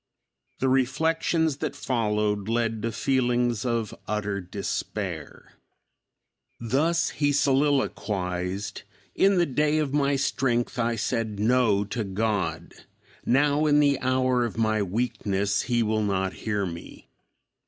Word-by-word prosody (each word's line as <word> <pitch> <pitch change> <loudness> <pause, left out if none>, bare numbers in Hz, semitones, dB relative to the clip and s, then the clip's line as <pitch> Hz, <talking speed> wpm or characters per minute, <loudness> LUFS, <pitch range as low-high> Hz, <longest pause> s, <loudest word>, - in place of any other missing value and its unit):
The 135 - 0
reflections 155 +4 +1
that 145 -1 -3
followed 105 -6 -1
led 115 -1 0
to 115 +1 -2
feelings 120 -1 +1
of 115 -3 -1
utter 105 -1 -2
despair. 95 +2 -5 1.1
Thus 155 +9 +1
he 145 0 +1
soliloquized, 105 -10 0 0.3
"In 195 0 +3
the 175 - +4
day 150 +1 +1
of 150 -3 -1
my 140 -1 +2
strength 130 -2 0
I 115 0 +1
said 115 -2 -2
'No' 110 -2 +3
to 110 +3 -3
God; 95 -5 -2 0.5
now, 145 +4 +3
in 145 0 +4
the 140 -2 +3
hour 130 -1 +1
of 115 -1 -4
my 110 -1 +1
weakness, 100 -1 -1
he 120 -1 +2
will 110 0 0
not 95 -2 0
hear 105 -2 -2
me. 85 -2 -9
120 Hz, 120 wpm, -26 LUFS, 105-135 Hz, 1.1 s, the